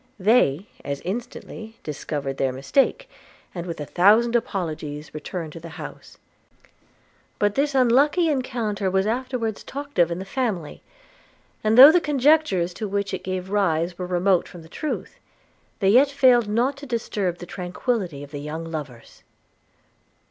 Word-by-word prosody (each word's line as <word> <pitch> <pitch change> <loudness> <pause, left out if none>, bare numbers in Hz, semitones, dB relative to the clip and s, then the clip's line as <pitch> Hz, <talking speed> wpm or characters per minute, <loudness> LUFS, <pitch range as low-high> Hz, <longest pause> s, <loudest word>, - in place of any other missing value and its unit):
They 195 - +3 0.2
as 140 0 -4
instantly 220 +1 -7
discovered 145 -2 -4
their 135 -1 +1
mistake, 270 - 0 0.5
and 175 -1 -6
with 170 - -5
a 150 - -4
thousand 215 +9 +4
apologies 155 -9 -3
returned 160 0 -6
to - - -8
the 165 0 -10
house: - - -10 1.2
but 205 0 +1
this 280 +2 0
unlucky 275 +7 +4
rencounter 230 -8 -1
was 190 +1 +2
afterwards 235 -1 -2
talked 285 -4 -6
of 170 -1 +5
in 170 - -3
the 190 - -6
family; 195 - -3 0.8
and, 215 +1 +2
though 275 +4 +12
the 350 +1 +3
conjectures 280 - +2
to 215 - -4
which 200 0 -2
it 190 - -4
gave 185 0 -4
rise 175 -3 0
were 180 - -3
remote 180 0 +2
from 175 -2 -12
the 160 - -15
truth, 305 - -5 0.6
they 195 - +4
yet 260 +7 +6
failed 250 -5 +4
not 240 +6 0
to 285 0 -10
disturb 205 -7 -2
the 175 - -9
tranquillity 180 - -3
of 145 - -12
the 145 -2 -6
young 155 +3 -5
lovers. 150 -7 -8
195 Hz, 155 wpm, -23 LUFS, 170-245 Hz, 1.2 s, though